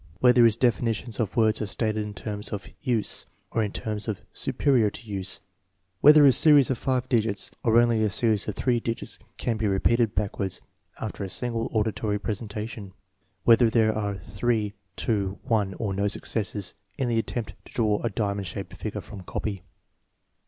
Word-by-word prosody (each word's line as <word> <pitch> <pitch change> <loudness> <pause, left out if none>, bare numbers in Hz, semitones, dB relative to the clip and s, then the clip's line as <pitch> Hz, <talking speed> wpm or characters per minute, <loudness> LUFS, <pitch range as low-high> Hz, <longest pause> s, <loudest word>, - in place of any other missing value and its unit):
Whether 125 -1 +6
his 115 -2 +5
definitions 115 -1 0
of 115 0 -2
words 110 -1 +3
are 105 - -1
stated 110 +2 -1
in 105 0 -7
terms 105 -1 -4
of 100 -1 -5
"use" 120 -7 -1 0.2
or 115 - +1
in 105 - -2
terms 105 0 -4 0.2
"su - - -2
perior 120 -7 +3
to 115 - -11
use 95 -2 -3 0.3
"? 95 -1 -47
Whether 150 0 +8
a 135 - +8
series 145 -1 +5
of 130 - -1
five 130 -1 0
digits 110 -5 0
or 115 0 +5
only 120 -2 +3
a 110 - +2
series 110 0 +2
of 105 - -3
three 125 -2 +1
digits 115 0 -3 0.2
can 115 -3 -1
be 110 -1 0
repeated 110 +3 +2
backwards 100 -2 -2 0.4
after 105 -2 -4
a 95 - -4
single 115 +2 -2
auditory 110 -1 0
presentation? 105 -1 -5 0.5
Whether 115 0 +6
there 110 -1 +3
are 100 -2 -2
three, 105 +3 -1 0.2
two, 100 -3 -1
one, 105 -4 0
or 100 -1 -2
no 100 +1 0
successes 100 -2 -2 0.2
in 130 - 0
the 115 -1 +1
attempt 115 -1 -3
to - - -14
draw 105 -3 +1
a 115 - 0
diamond 100 -1 -2
shaped 80 - -6
figure - - -5
from 100 - -10
copy? 95 +1 -4
110 Hz, 180 wpm, -26 LUFS, 100-115 Hz, 0.5 s, Whether